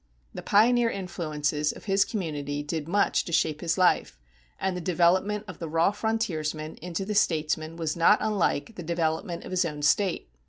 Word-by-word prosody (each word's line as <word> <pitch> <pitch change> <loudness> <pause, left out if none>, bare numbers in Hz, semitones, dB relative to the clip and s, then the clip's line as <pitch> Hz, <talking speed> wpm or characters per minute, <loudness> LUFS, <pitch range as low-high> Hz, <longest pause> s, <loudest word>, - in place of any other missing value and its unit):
The - - -6
pioneer 235 +3 +4
influences 155 -6 -2
of - - -12
his 195 0 +3
community 145 -7 -3
did 155 0 -4
much 200 +4 +2
to - - -6
shape 155 -2 +1
his 165 0 0
life, 180 - +2 0.4
and 190 -1 -1
the 180 - -4
development 185 +4 +2
of 185 -4 -9
the 165 - -5
raw 165 +4 +3
frontiersman 165 -9 -2
into 180 +2 -4
the 210 - -3
statesman 160 -4 0
was 160 -2 -2
not 170 +5 +5
unlike 210 -2 0
the - - -5
development 170 0 -2
of - - -9
his 185 0 +2
own 150 -3 -4
State. 175 - +2
170 Hz, 175 wpm, -27 LUFS, 155-195 Hz, 0.4 s, not